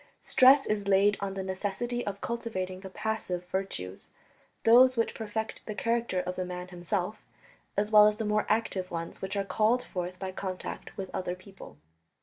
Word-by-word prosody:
Stress 270 +2 +6
is 205 -1 -1
laid 200 +1 +5
on 195 -1 -3
the 190 - -3
necessity 205 +6 -2
of 200 0 -4
cultivating 185 -6 -3
the 190 0 -8
"passive" 185 -4 -3
virtues 100 - -4 0.5
those 250 +2 +7
which 230 - +1
perfect 220 0 -4
the 215 - -4
character 230 -4 0
of 180 0 -4
the 185 - 0
man 180 0 -6
himself 180 +3 -2 0.6
as 210 +1 +1
well 210 -1 +9
as 210 0 +1
the 225 - -2
more 210 0 +1
active 205 -4 0
ones 165 -1 -5
which 190 +1 -3
are 200 - 0
called 220 +5 +2
forth 180 -1 -5
by 190 0 -4
contact 185 -1 -6
with 190 -1 -5
other 180 -1 -2
people. 185 - -13
200 Hz, 175 wpm, -29 LUFS, 185-220 Hz, 0.6 s, well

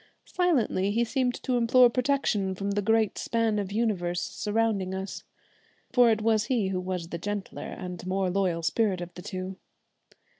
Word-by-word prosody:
Silently 260 - +1
he 230 +3 +2
seemed 250 +1 0
to 250 -1 +1
implore 245 +1 +6
protection 240 -6 0
from 200 +2 -3
the 205 +1 0
great 220 +1 +2
span 225 -2 0
of 200 -1 -4
universe 195 -6 0
surrounding 210 -2 -1
us 190 +1 -5 0.7
for 245 -2 +6
it 215 -1 +1
was 220 -1 +3
he 230 -6 0
who 185 -1 -1
was 180 -2 -4
the 170 - -5
gentler 205 +2 -4
and 180 -1 -7
more 190 0 0
loyal 180 -3 0
spirit 190 +3 +1
of 175 0 -7
the 180 - -9
two. 185 +1 -5
205 Hz, 165 wpm, -27 LUFS, 185-230 Hz, 0.7 s, implore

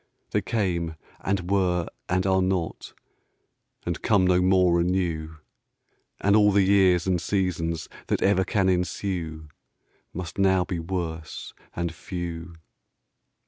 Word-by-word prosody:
They - - +1
came 85 -7 -1 0.2
and 95 -1 -2
were 90 -3 +2 0.2
and 90 +1 +1
are 95 -1 +3
not 90 -3 -2 0.9
And 85 -2 -3
come 100 -4 +3
no 90 0 +4
more 90 -2 +4
anew; 85 -3 -1 0.8
And 100 +1 +3
all 105 -1 +6
the 100 0 +4
years 95 -2 +4
and 90 -3 +1
seasons 85 -3 -1 0.2
That - - 0
ever 95 -1 +4
can 95 +1 +1
ensue 90 -3 -2 0.6
Must 90 +2 -6
now 95 -2 +3
be 90 -1 -3
worse 80 -2 -5 0.2
and 85 -1 -2
few. 85 -1 -6
90 Hz, 125 wpm, -26 LUFS, 85-95 Hz, 0.9 s, all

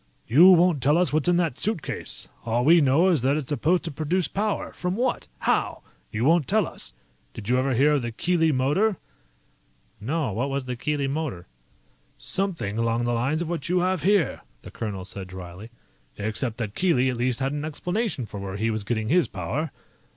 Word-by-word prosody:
"You 175 +10 +8
won't 175 -4 +3
tell 145 +5 +3
us 180 -3 +2
what's 155 +2 +2
in 175 - +3
that 165 -7 0
suitcase. 210 -7 -3 0.2
All 120 +2 0
we 165 +2 +7
know 145 +7 +4
is 165 -8 +2
that 135 +4 +2
it's 145 -5 -4
supposed 155 +6 +1
to 165 - -4
produce 160 +5 0
power. 210 +1 -2
From 180 +1 -3
what? 245 +3 -1
How? - - 0 0.3
You 110 +3 -1
won't 165 -1 +3
tell 215 -1 +3
us. - - -7 0.4
Did 110 -1 -7
you 125 +1 +3
ever 130 0 0
hear 140 +5 +4
of 145 -2 +2
the 120 -1 -4
Keely 165 +6 +1
Motor?" 150 +10 +1 1.0
"No. 135 +3 -1
What 125 +7 -1
was 135 -1 -2
the 125 -1 -3
Keely 145 +2 -1
Motor?" 135 - -3 0.7
"Something 170 - -2
along 115 +1 +1
the 120 0 0
lines 135 +8 0
of 165 - -6
what 170 -2 -3
you 180 0 +2
have 185 -2 0
here," 190 -3 +2 0.2
the - - -10
colonel 100 -5 -5
said 95 0 -8
dryly, 90 +3 -9 0.5
"except 110 +3 -2
that 110 -4 -4
Keely 130 -7 +2
at 125 - -5
least 125 0 0
had 135 0 0
an 145 0 -3
explanation 175 - -2
for 105 -2 -8
where 100 0 -5
he 110 +2 0
was 110 -1 -2
getting 110 +1 -2
his 175 +1 +3
power. 110 - -3
140 Hz, 200 wpm, -25 LUFS, 115-170 Hz, 1.0 s, You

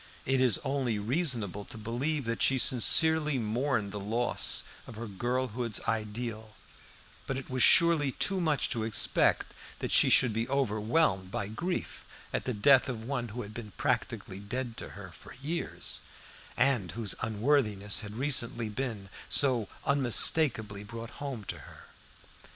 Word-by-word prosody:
It 135 0 +2
is 125 -6 +4
only 130 -5 -1
reasonable 115 - -1
to - - -10
believe 125 +7 -2
that 115 0 -3
she 135 - +3
sincerely 150 +5 +4
mourned 115 -1 -1
the 105 - -5
loss 115 +5 +1 0.2
of - - -10
her 115 +2 -6
girlhood's 120 +1 -2
ideal, 110 0 -4 0.7
but 135 - -2
it 135 - -8
was 130 0 -1
surely 165 -3 +5
too 195 -2 0
much 155 -5 +1
to 115 - -1
expect 110 -1 +2 0.2
that - - -4
she - - +6
should 125 -4 +5
be 115 +3 -2
overwhelmed 110 - +1
by 105 -2 -4
grief 175 +11 -4 0.3
at - - -2
the 125 - -1
death 135 +5 +5
of 115 -3 -5
one 120 -2 -3
who 120 +3 -6
had 105 +1 -10
been 110 -3 -8
practically 95 - -2
dead 120 +4 -4
to - - -6
her 95 -3 -9
for - - -14
years, 150 +6 -4 0.6
and 125 -9 +1
whose 110 -3 -1
unworthiness 110 -2 +1
had 105 -2 -7
recently 120 -3 +1
been 110 -4 -4 0.2
so 125 -7 +3 0.2
unmistakably 125 -6 +2
brought 115 +3 -8
home 135 -6 -5
to - - -6
her. - - -14
120 Hz, 150 wpm, -30 LUFS, 105-135 Hz, 0.7 s, she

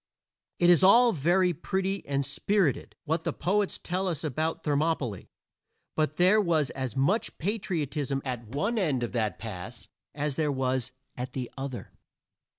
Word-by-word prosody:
It 175 0 +5
is 175 - +5
all 235 +6 +7
very 175 +2 +2
pretty 190 +4 -2
and 140 -1 0
spirited, 155 - 0
what 160 +1 -1
the - - 0
poets 200 +2 0
tell 185 +2 -2
us 165 -5 -2
about 155 +2 -2
Thermopylæ, 145 - 0 0.7
but 155 -1 0
there 185 +5 +5
was 160 -7 +1
as 130 -4 -4
much 180 +12 +1
patriotism 155 - -1
at 125 -3 -4
one 200 - -1
end 145 -10 +1
of 120 - -3
that 110 -4 -1
pass 110 +1 -7 0.3
as 145 -2 -2
there 155 -2 +1
was 130 -1 -1 0.2
at 125 0 -5
the 125 -3 -4
other. 135 -2 -6
150 Hz, 155 wpm, -28 LUFS, 130-185 Hz, 0.7 s, all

